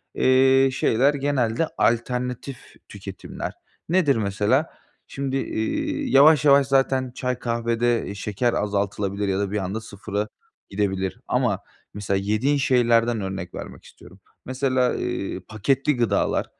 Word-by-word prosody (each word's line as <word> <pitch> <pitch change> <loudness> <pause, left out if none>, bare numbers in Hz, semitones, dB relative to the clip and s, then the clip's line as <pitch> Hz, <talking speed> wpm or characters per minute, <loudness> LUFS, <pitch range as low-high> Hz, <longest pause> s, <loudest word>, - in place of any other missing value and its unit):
eee, 130 +1 +4
şeyler 130 +3 +2
genelde 140 0 0
alternatif 125 +2 -2
tüketimler. - - -7 0.4
Nedir 170 -5 +3
mesela? 105 +7 +1 0.4
Şimdi, 135 -1 -3
iii, 110 -4 -2
yavaş 150 +3 +6
yavaş 140 -1 +6
zaten 135 -1 +1
çay, 125 -1 -2
kahvede, 115 0 0
eee, 100 - -6
şeker 105 +4 -1
azaltılabilir 100 0 -1
ya 95 0 0
da 100 -1 -2
bir 105 - -1
anda 100 +3 -3
0'a 105 -1 -4 0.4
gidebilir 95 -2 -2
ama - - +1 0.3
mesela 100 -1 -1
yediğin 110 +9 +1
şeylerden 120 -3 +2
örnek 95 -2 -5
vermek - - -9
istiyorum. 90 - -16 0.3
Mesela, 130 -1 0
eee, 100 - -3
paketli 135 +7 0
gıdalar 120 -2 +1
120 Hz, 125 wpm, -23 LUFS, 105-135 Hz, 0.4 s, yavaş